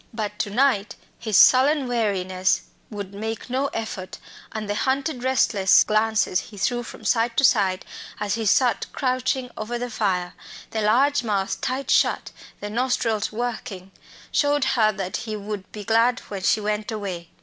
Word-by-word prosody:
But 210 Hz, -2 st, -4 dB
to -, -, -1 dB
night 215 Hz, -2 st, +1 dB, 0.2 s
his 215 Hz, -5 st, +1 dB
sullen 270 Hz, +2 st, +6 dB
weariness 190 Hz, -6 st, 0 dB, 0.3 s
would 200 Hz, -2 st, -7 dB
make 220 Hz, +4 st, -5 dB
no 265 Hz, +2 st, +1 dB
effort, 220 Hz, -7 st, -5 dB, 0.3 s
and 215 Hz, -1 st, -5 dB
the 205 Hz, -, -1 dB
hunted 265 Hz, +4 st, -1 dB
restless 225 Hz, -7 st, +4 dB
glances 215 Hz, -3 st, +1 dB
he 205 Hz, +2 st, -11 dB
threw 240 Hz, +5 st, 0 dB
from 240 Hz, -, -11 dB
side 230 Hz, 0 st, +1 dB
to -, -, +3 dB
side 195 Hz, -7 st, +3 dB, 0.3 s
as 205 Hz, -1 st, -1 dB
he 225 Hz, -2 st, -1 dB
sat 245 Hz, +1 st, +2 dB
crouching 255 Hz, -1 st, -1 dB
over 225 Hz, +3 st, -4 dB
the 245 Hz, 0 st, -4 dB
fire 185 Hz, -5 st, -1 dB, 0.4 s
the 220 Hz, -, -2 dB
large 270 Hz, +7 st, +3 dB
mouth 200 Hz, -4 st, -1 dB
tight 265 Hz, +2 st, -2 dB
shut, -, -, +2 dB, 0.3 s
the 205 Hz, -, -4 dB
nostrils 235 Hz, -3 st, 0 dB
working 220 Hz, -5 st, -5 dB, 0.4 s
showed 290 Hz, -1 st, +2 dB
her 215 Hz, -3 st, +3 dB
that 190 Hz, -3 st, -4 dB
he 220 Hz, -1 st, -5 dB
would 205 Hz, -1 st, -6 dB
be 210 Hz, -, -7 dB
glad 230 Hz, +4 st, +3 dB
when 195 Hz, -2 st, -4 dB
she 200 Hz, -, +2 dB
went 210 Hz, +1 st, -2 dB
away. 190 Hz, -6 st, -5 dB
220 Hz, 160 wpm, -23 LUFS, 200-245 Hz, 0.4 s, sullen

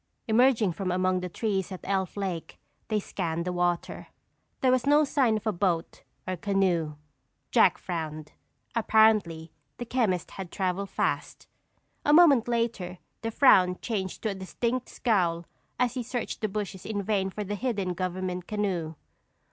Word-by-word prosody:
Emerging 225 Hz, -3 st, +4 dB
from 185 Hz, +2 st, -3 dB
among 185 Hz, 0 st, +1 dB
the 180 Hz, 0 st, -5 dB
trees 195 Hz, 0 st, -2 dB
at 185 Hz, -, -6 dB
Elf 190 Hz, -1 st, -1 dB
Lake, 185 Hz, -5 st, -4 dB, 0.3 s
they 215 Hz, -, +1 dB
scanned 170 Hz, -4 st, -3 dB
the 180 Hz, -, -2 dB
water. 175 Hz, -1 st, -1 dB, 0.5 s
There 260 Hz, -, +4 dB
was 255 Hz, +1 st, +1 dB
no 295 Hz, +1 st, +6 dB
sign 265 Hz, -6 st, +2 dB
of 215 Hz, -, -8 dB
a 215 Hz, -, +2 dB
boat 175 Hz, -3 st, -1 dB, 0.3 s
or 185 Hz, -1 st, -2 dB
canoe. 175 Hz, -5 st, +1 dB, 0.6 s
Jack -, -, +5 dB
frowned. 155 Hz, -3 st, -5 dB, 0.4 s
Apparently, 215 Hz, -8 st, +3 dB, 0.3 s
the 240 Hz, -, -5 dB
chemist 225 Hz, -8 st, 0 dB
had 190 Hz, -3 st, -7 dB
traveled 190 Hz, 0 st, -2 dB
fast. -, -, -2 dB, 0.6 s
A 295 Hz, -, +3 dB
moment 295 Hz, -8 st, +6 dB
later, 230 Hz, -7 st, -1 dB, 0.2 s
the 225 Hz, -, -2 dB
frown 185 Hz, -7 st, +5 dB
changed 195 Hz, -6 st, -4 dB
to 220 Hz, -, +1 dB
a -, -, -2 dB
distinct 230 Hz, +6 st, -3 dB
scowl 175 Hz, -7 st, 0 dB, 0.3 s
as 250 Hz, -1 st, +1 dB
he 255 Hz, -, -2 dB
searched 245 Hz, 0 st, -4 dB
the 215 Hz, -, 0 dB
bushes 195 Hz, -2 st, -4 dB
in 205 Hz, -2 st, -3 dB
vain 195 Hz, -1 st, 0 dB
for 210 Hz, +2 st, -5 dB
the 205 Hz, +1 st, -4 dB
hidden 205 Hz, -5 st, -1 dB
government 185 Hz, 0 st, -3 dB
canoe. 185 Hz, -7 st, -2 dB
195 Hz, 155 wpm, -27 LUFS, 180-225 Hz, 0.6 s, no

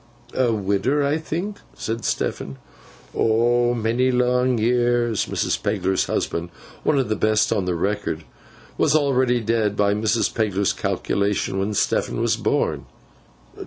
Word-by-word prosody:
'A 125 Hz, -3 st, +2 dB
widder, 110 Hz, +7 st, +1 dB
I 145 Hz, +3 st, +1 dB
think?' 175 Hz, +6 st, -4 dB, 0.2 s
said 115 Hz, +1 st, -4 dB
Stephen. 70 Hz, -1 st, -2 dB, 0.6 s
'Oh, 120 Hz, +2 st, +2 dB
many 120 Hz, +3 st, +1 dB
long 125 Hz, 0 st, +2 dB
years!' 120 Hz, -1 st, +1 dB
Mrs. -, -, -1 dB
Pegler's 95 Hz, -2 st, 0 dB
husband 85 Hz, +1 st, -2 dB, 0.3 s
(one 150 Hz, -, +2 dB
of 135 Hz, -, +1 dB
the 110 Hz, -, 0 dB
best 110 Hz, +1 st, +2 dB
on 100 Hz, -4 st, -1 dB
record) 100 Hz, +4 st, -1 dB, 0.6 s
was 150 Hz, -1 st, +3 dB
already 130 Hz, -4 st, +2 dB
dead, 110 Hz, -2 st, 0 dB
by 100 Hz, 0 st, +3 dB
Mrs. 110 Hz, +2 st, +1 dB
Pegler's 100 Hz, -3 st, 0 dB
calculation, 100 Hz, -1 st, -1 dB
when 100 Hz, +2 st, -1 dB
Stephen -, -, 0 dB
was -, -, +2 dB
born. -, -, -1 dB
115 Hz, 130 wpm, -22 LUFS, 100-125 Hz, 0.6 s, was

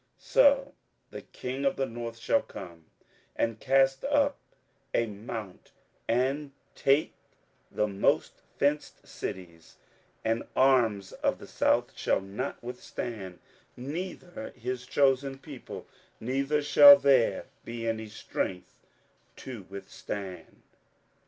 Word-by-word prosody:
27:011:015 -, -, -25 dB
So -, -, +5 dB, 0.4 s
the -, -, -7 dB
king 130 Hz, +2 st, -5 dB
of 140 Hz, -, +2 dB
the 135 Hz, -, 0 dB
north 115 Hz, -1 st, -6 dB
shall 280 Hz, -, +2 dB
come, 85 Hz, -4 st, -10 dB, 0.5 s
and 115 Hz, -1 st, -1 dB
cast 135 Hz, 0 st, +3 dB
up 285 Hz, 0 st, +2 dB, 0.6 s
a 115 Hz, -, +3 dB
mount, 105 Hz, -2 st, -8 dB, 0.3 s
and 135 Hz, +4 st, 0 dB, 0.2 s
take 140 Hz, +3 st, +2 dB, 0.6 s
the 105 Hz, -, 0 dB
most 100 Hz, -1 st, 0 dB, 0.2 s
fenced 145 Hz, +1 st, 0 dB
cities: 85 Hz, -4 st, -7 dB, 0.5 s
and 115 Hz, +1 st, +1 dB
the -, -, -12 dB
arms 115 Hz, -8 st, +3 dB
of -, -, -1 dB
the -, -, -11 dB
south -, -, +1 dB
shall -, -, +1 dB
not 100 Hz, +9 st, -5 dB
withstand, 115 Hz, -6 st, -6 dB, 0.4 s
neither 170 Hz, +1 st, -6 dB
his 125 Hz, +1 st, -4 dB
chosen 135 Hz, -1 st, +2 dB
people, -, -, -9 dB, 0.3 s
neither 135 Hz, +5 st, 0 dB
shall 285 Hz, -, +10 dB
there 135 Hz, -, +3 dB, 0.2 s
be 115 Hz, 0 st, -5 dB
any 110 Hz, -1 st, -2 dB
strength 95 Hz, -3 st, -4 dB, 0.6 s
to 120 Hz, -8 st, -9 dB
withstand. 95 Hz, -2 st, -7 dB
125 Hz, 115 wpm, -29 LUFS, 105-140 Hz, 0.6 s, shall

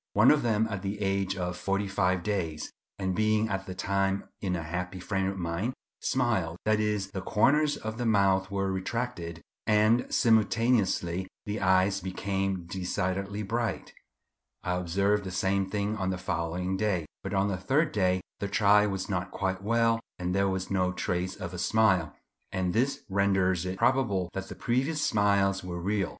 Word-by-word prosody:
One 105 Hz, +5 st, +6 dB
of 150 Hz, -, +3 dB
them 110 Hz, -2 st, +2 dB
at 100 Hz, -4 st, -4 dB
the 100 Hz, +1 st, -3 dB
age 95 Hz, -1 st, 0 dB
of 90 Hz, -1 st, -2 dB
forty 100 Hz, +3 st, -1 dB
five 95 Hz, -2 st, +1 dB
days, 85 Hz, -7 st, -2 dB, 0.3 s
and 95 Hz, -1 st, -1 dB
being 110 Hz, 0 st, +2 dB
at 95 Hz, -1 st, -3 dB
the 95 Hz, -, -5 dB
time 95 Hz, 0 st, 0 dB, 0.2 s
in 95 Hz, -3 st, -1 dB
a 85 Hz, -, -3 dB
happy 90 Hz, +3 st, -4 dB
frame 95 Hz, +1 st, -1 dB
of 95 Hz, 0 st, -3 dB
mind, 90 Hz, +8 st, -2 dB, 0.2 s
smiled; 110 Hz, -10 st, 0 dB
that 110 Hz, 0 st, +3 dB
is, 105 Hz, -2 st, -1 dB
the 95 Hz, -, -4 dB
corners 145 Hz, +10 st, +3 dB
of 110 Hz, +1 st, -6 dB
the 120 Hz, -, -1 dB
mouth 95 Hz, -3 st, +3 dB
were 95 Hz, -1 st, -1 dB
retracted, 95 Hz, -4 st, -3 dB, 0.2 s
and 110 Hz, +2 st, +3 dB
simultaneously 110 Hz, -5 st, +2 dB, 0.2 s
the 105 Hz, +1 st, -3 dB
eyes 95 Hz, +1 st, +3 dB
became 95 Hz, -1 st, -2 dB
decidedly 95 Hz, +2 st, -2 dB
bright. 115 Hz, 0 st, -2 dB, 0.7 s
I 90 Hz, -, 0 dB
observed 100 Hz, +4 st, +1 dB
the 95 Hz, -, -5 dB
same 95 Hz, +1 st, 0 dB
thing 105 Hz, +1 st, -1 dB
on 95 Hz, -3 st, -1 dB
the 95 Hz, -, -1 dB
following 90 Hz, +1 st, -2 dB
day; 95 Hz, -5 st, 0 dB, 0.2 s
but 95 Hz, +1 st, -4 dB
on 95 Hz, +1 st, +2 dB
the 100 Hz, -, -1 dB
third 140 Hz, -, +1 dB
day 95 Hz, -2 st, +1 dB, 0.2 s
the 100 Hz, -, -2 dB
child 105 Hz, 0 st, +4 dB
was 95 Hz, -1 st, -3 dB
not 90 Hz, -2 st, -2 dB
quite 95 Hz, -1 st, -2 dB
well 115 Hz, +2 st, +2 dB, 0.2 s
and 90 Hz, 0 st, -2 dB
there 100 Hz, 0 st, +2 dB
was 95 Hz, 0 st, -3 dB
no 90 Hz, -2 st, +2 dB
trace 90 Hz, 0 st, -2 dB
of 90 Hz, 0 st, -6 dB
a 90 Hz, -, -5 dB
smile, 95 Hz, -6 st, +2 dB, 0.4 s
and 90 Hz, -1 st, -1 dB
this 130 Hz, +5 st, 0 dB
renders 95 Hz, -2 st, +2 dB
it 95 Hz, +1 st, -3 dB
probable 115 Hz, -7 st, +1 dB
that 95 Hz, 0 st, -5 dB
the -, -, -7 dB
previous 135 Hz, +6 st, 0 dB
smiles 100 Hz, -2 st, +2 dB
were 90 Hz, -1 st, -5 dB
real. 100 Hz, +2 st, 0 dB
95 Hz, 175 wpm, -29 LUFS, 95-105 Hz, 0.7 s, One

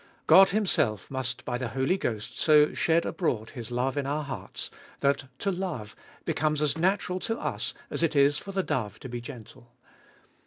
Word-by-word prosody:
God 195 Hz, +1 st, +8 dB
Himself 150 Hz, -, +1 dB
must 130 Hz, -1 st, -3 dB
by 125 Hz, -1 st, -2 dB
the 125 Hz, -, -2 dB
Holy 135 Hz, +7 st, +2 dB
Ghost 110 Hz, -, -3 dB
so 150 Hz, -1 st, +5 dB
shed 165 Hz, 0 st, +2 dB
abroad 115 Hz, -, -1 dB
His 115 Hz, -3 st, -7 dB
love 125 Hz, +3 st, -1 dB
in 140 Hz, -1 st, -1 dB
our 150 Hz, +2 st, -1 dB
hearts, 140 Hz, -, -6 dB, 0.3 s
that 140 Hz, 0 st, +2 dB
to 200 Hz, -, 0 dB
love 175 Hz, -, -4 dB, 0.3 s
becomes 155 Hz, -1 st, +1 dB
as 150 Hz, 0 st, +1 dB
natural 185 Hz, +2 st, +1 dB
to 225 Hz, +4 st, -2 dB
us -, -, -3 dB, 0.2 s
as -, -, -2 dB
it 165 Hz, -2 st, +1 dB
is 140 Hz, +1 st, +4 dB
for 200 Hz, -, -8 dB
the 190 Hz, -1 st, 0 dB
dove 110 Hz, -, -2 dB
to -, -, -6 dB
be 120 Hz, 0 st, -4 dB
gentle. 120 Hz, 0 st, -11 dB
140 Hz, 185 wpm, -28 LUFS, 120-170 Hz, 0.3 s, God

